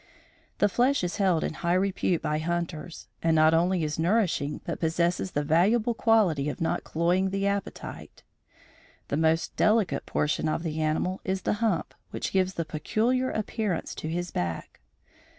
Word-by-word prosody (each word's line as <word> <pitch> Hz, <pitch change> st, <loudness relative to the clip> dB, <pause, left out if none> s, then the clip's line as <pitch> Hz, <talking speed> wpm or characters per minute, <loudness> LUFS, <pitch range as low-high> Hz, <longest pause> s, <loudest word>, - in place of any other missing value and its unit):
The 205 Hz, -, +4 dB
flesh 245 Hz, +4 st, +2 dB
is 175 Hz, +2 st, -2 dB
held 185 Hz, -6 st, +2 dB
in -, -, -2 dB
high 170 Hz, +2 st, 0 dB
repute 185 Hz, -2 st, 0 dB
by 150 Hz, 0 st, 0 dB
hunters, 170 Hz, 0 st, -4 dB
and 165 Hz, -1 st, +2 dB
not 155 Hz, 0 st, +5 dB
only 175 Hz, +1 st, +2 dB
is 150 Hz, 0 st, -2 dB
nourishing 170 Hz, -5 st, +1 dB
but -, -, -4 dB
possesses 170 Hz, +3 st, 0 dB
the 145 Hz, -, 0 dB
valuable 205 Hz, +10 st, +3 dB
quality 195 Hz, -12 st, +2 dB
of -, -, -6 dB
not 165 Hz, -, -1 dB
cloying 175 Hz, +4 st, +1 dB
the 195 Hz, +1 st, -1 dB
appetite. 200 Hz, 0 st, -4 dB, 0.9 s
The 140 Hz, -, 0 dB
most 160 Hz, +1 st, +1 dB
delicate 215 Hz, -3 st, +2 dB
portion 150 Hz, +1 st, 0 dB
of 165 Hz, -, -2 dB
the 160 Hz, -1 st, -2 dB
animal 155 Hz, +4 st, -1 dB
is 190 Hz, 0 st, -2 dB
the -, -, +1 dB
hump 215 Hz, -8 st, 0 dB, 0.2 s
which -, -, -4 dB
gives 190 Hz, -1 st, +1 dB
the 165 Hz, -, -2 dB
peculiar 225 Hz, -, 0 dB
appearance 215 Hz, -4 st, -2 dB
to 155 Hz, -, -5 dB
his 175 Hz, +2 st, -3 dB
back. 85 Hz, -2 st, -4 dB
175 Hz, 165 wpm, -27 LUFS, 160-195 Hz, 0.9 s, not